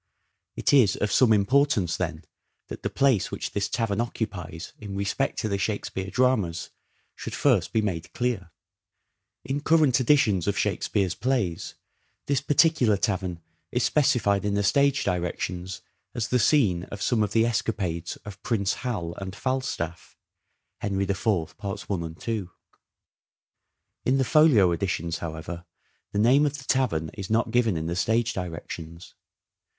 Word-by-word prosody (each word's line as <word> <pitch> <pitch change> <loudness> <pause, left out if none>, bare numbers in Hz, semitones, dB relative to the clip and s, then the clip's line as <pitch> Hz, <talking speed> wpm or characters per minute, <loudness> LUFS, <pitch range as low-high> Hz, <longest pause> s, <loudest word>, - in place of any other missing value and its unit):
It - - +1
is 120 -9 +5
of 105 - -1
some 120 +2 +5
importance, 105 - +3
then, 85 -3 -4 0.4
that - - -7
the - - -2
place 130 -8 +2
which - - -4
this 100 -1 -1
tavern 115 -3 0
occupies 90 -8 -5
in 100 -2 -7
respect 100 +7 -1
to 110 - -1
the 100 -2 -1
Shakespeare 95 -2 -3
dramas 100 -7 +1 0.4
should - - -6
first - - +2
be 110 - +1
made 85 -5 -3
clear. 120 -8 -2 1.0
In 140 +2 -2
current 150 -5 +4
editions 115 - +3
of 100 - 0
Shakespeare's 95 -4 0
plays, 110 -7 -1 0.5
this 140 -2 +1
particular 145 -7 +3
tavern 95 -6 -2 0.3
is - - 0
specified 105 -9 +2
in 100 0 0
the 100 - +1
stage 140 +5 +3
directions 90 +1 -3 0.3
as 115 -2 -2
the 125 - +2
scene 105 - +3
of 100 - -8
some 120 -3 +2
of 105 -1 0
the 115 0 +4
escapades 95 -7 -2
of 105 -2 -9
Prince 100 -5 0
Hal 100 -10 -3
and 95 0 -6
Falstaff 125 -11 -3 0.6
(Henry 100 -1 -1
IV, 95 -4 -1
parts 100 0 -5
i - - -1
and 85 -3 -4
2). 110 -6 -3 1.6
In 130 +2 +3
the 135 - +2
Folio 125 - +5
Editions, 85 -1 -2
however, 85 +1 -6 0.5
the - - -3
name 130 +8 +5
of 145 0 -3
the 140 - -10
tavern 125 -13 0
is 95 -2 -7
not 115 +2 +1
given 115 -7 +2
in 80 - -3
the 85 +1 -2
stage 115 +5 +1
directions. 85 -1 -7
100 Hz, 150 wpm, -26 LUFS, 90-125 Hz, 1.6 s, is